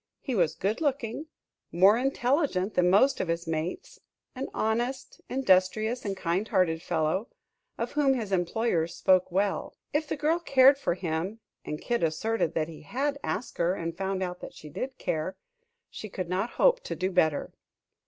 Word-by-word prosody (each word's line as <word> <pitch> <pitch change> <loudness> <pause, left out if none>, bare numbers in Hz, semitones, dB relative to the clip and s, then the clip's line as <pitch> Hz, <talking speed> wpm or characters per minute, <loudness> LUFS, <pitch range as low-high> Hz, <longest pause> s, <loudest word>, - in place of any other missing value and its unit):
He 265 - -4
was 175 -8 +2
good 210 - -1
looking, 280 -1 -1 0.4
more 190 +5 +6
intelligent 250 - +1
than 180 0 +3
most 215 +9 +4
of - - -2
his 170 +1 -2
mates, 160 +2 -4 0.3
an 265 +1 -4
honest, 240 +4 -2
industrious 220 0 +2
and 195 -1 -2
kind 185 +4 -1
hearted 180 -6 +2
fellow, 170 +5 0 0.5
of - - -3
whom 280 -3 +3
his 220 -5 -4
employers 175 -2 0
spoke 185 -1 +3
well. 195 +2 -1 0.2
If 300 +1 0
the - - -3
girl 310 +4 +1
cared 275 -3 +5
for 175 - 0
him 180 +4 -3 0.2
and 150 - -5
Kid 240 -1 -1
asserted 165 +2 0
that 155 -1 0
he 165 -2 -10
had 280 - -2
asked 245 - -4
her 175 +2 +2
and 165 -2 -4
found 190 0 -2
out 180 -1 -4
that - - -9
she 150 - -11
did 260 - -5
care 160 +4 -2 0.5
she 215 - -7
could 185 -2 -5
not 190 +6 0
hope - - +5
to - - -3
do 185 +1 -1
better. 160 -4 +1
195 Hz, 175 wpm, -28 LUFS, 175-255 Hz, 0.5 s, more